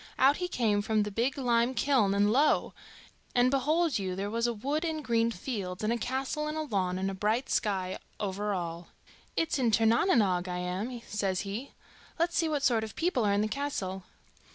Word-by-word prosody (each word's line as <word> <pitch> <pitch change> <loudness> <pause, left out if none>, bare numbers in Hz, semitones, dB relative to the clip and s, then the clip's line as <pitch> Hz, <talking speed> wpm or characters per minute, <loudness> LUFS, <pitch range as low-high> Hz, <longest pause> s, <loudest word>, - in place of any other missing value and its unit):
Out 275 +3 +5
he 360 - -2
came 220 -10 +1
from 215 0 +1
the 210 - -4
big 245 +8 0
lime 245 -1 +2
kiln, 230 -5 +2
and, 205 +1 +3
lo! 285 +6 +3 0.6
and 245 +1 +4
behold 300 +1 +2
you, 185 -2 -3
there 200 +2 -3
was 230 +1 +1
a 240 - 0
wood, 280 +9 -2
and 315 -3 -3
green 230 -1 +2
fields, 195 -4 -4
and 215 +2 +2
a - - 0
castle 265 +5 -2
in 305 - -3
a 315 - -1
lawn, 190 -9 -1
and 190 +1 -1
a - - -5
bright 215 +6 0
sky 190 -3 0 0.2
over 205 +1 -2
all. 170 -2 -4 0.5
'It's 325 -3 +1
in 245 -3 +3
Tir 225 +1 +3
na 230 +1 +4
n 255 - +5
Oge 185 -3 +1
I 180 0 -3
am,' 200 +7 -4
says 195 -3 -1
he. 210 +7 -6 0.4
'Let's 340 +1 0
see 325 -2 +2
what 295 -2 -1
sort 235 -5 +3
of 220 -2 -7
people 330 -8 +1
are 200 - +3
in 200 - +2
the 215 - +1
castle. 205 -8 -3
225 Hz, 215 wpm, -30 LUFS, 200-270 Hz, 0.6 s, Out